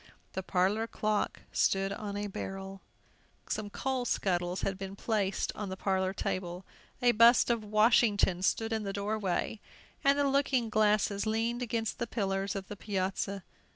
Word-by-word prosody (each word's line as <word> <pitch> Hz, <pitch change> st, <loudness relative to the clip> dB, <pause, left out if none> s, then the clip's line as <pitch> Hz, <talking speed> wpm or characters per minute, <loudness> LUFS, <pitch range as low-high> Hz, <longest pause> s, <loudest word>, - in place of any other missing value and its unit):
The 190 Hz, -, -2 dB
parlor 195 Hz, +4 st, +1 dB
clock 215 Hz, -2 st, -1 dB
stood 195 Hz, 0 st, +2 dB
on 205 Hz, 0 st, -5 dB
a 205 Hz, -, -2 dB
barrel; 195 Hz, -1 st, -6 dB, 0.7 s
some 215 Hz, -1 st, -3 dB
coal 260 Hz, +3 st, -2 dB
scuttles 180 Hz, -5 st, 0 dB
had 195 Hz, -, -1 dB
been 195 Hz, 0 st, -6 dB
placed 200 Hz, -2 st, -1 dB
on 210 Hz, -2 st, -5 dB
the 190 Hz, -, -5 dB
parlor 190 Hz, -1 st, 0 dB
table, 180 Hz, -1 st, -3 dB, 0.4 s
a 245 Hz, -, +6 dB
bust 235 Hz, +2 st, +6 dB
of 230 Hz, -2 st, 0 dB
Washington 210 Hz, -3 st, +3 dB
stood 225 Hz, +4 st, +1 dB
in 220 Hz, -, 0 dB
the 200 Hz, -1 st, -4 dB
door 205 Hz, +2 st, -2 dB
way, 200 Hz, +2 st, -2 dB, 0.4 s
and 275 Hz, +1 st, +4 dB
the 285 Hz, -1 st, +3 dB
looking 270 Hz, -4 st, +2 dB
glasses 210 Hz, -1 st, +2 dB
leaned 230 Hz, +2 st, 0 dB
against 230 Hz, -1 st, -2 dB
the 235 Hz, -, -1 dB
pillars 195 Hz, -2 st, -1 dB
of 195 Hz, -1 st, -5 dB
the 205 Hz, -, -6 dB
piazza. 195 Hz, -1 st, -2 dB
205 Hz, 160 wpm, -31 LUFS, 195-225 Hz, 0.7 s, a